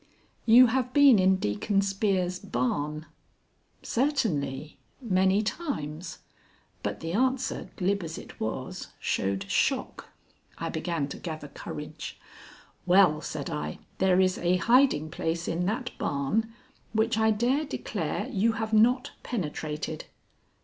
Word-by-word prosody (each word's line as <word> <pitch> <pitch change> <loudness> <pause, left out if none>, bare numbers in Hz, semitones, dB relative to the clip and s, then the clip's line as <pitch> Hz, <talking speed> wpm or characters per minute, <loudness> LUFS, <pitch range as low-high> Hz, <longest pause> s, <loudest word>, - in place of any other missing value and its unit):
"You 240 +3 +9
have 250 +1 0
been 280 -7 +7
in 190 +1 +5
Deacon 185 - 0
Spear's 195 -2 0
barn." 145 +5 -2 0.8
"Certainly, 165 - -1 0.2
many 190 -3 +2
times." 175 - -4 0.6
But - - -3
the 165 0 -3
answer, 260 +4 0
glib 200 +1 0
as 165 -1 -6
it - - -11
was, - - -4
showed 95 0 -1
shock. - - 0 0.5
I - - -3
began 160 -3 -2
to - - -6
gather 155 -4 -6
courage. - - -7 0.7
"Well," 175 -4 +5
said 145 -1 -5
I, 75 0 -4 0.2
"there 185 -1 +4
is 185 0 +2
a 175 +1 +2
hiding 205 - +3
place 165 +1 -2
in 175 +2 -1
that 245 +5 -2
barn 145 +12 0 0.4
which 220 0 +2
I 220 0 +4
dare 240 +7 +2
declare 200 - -3
you 220 +3 +1
have 220 0 -3
not 245 +5 +4
penetrated." 155 -7 -4
190 Hz, 125 wpm, -28 LUFS, 155-225 Hz, 0.8 s, You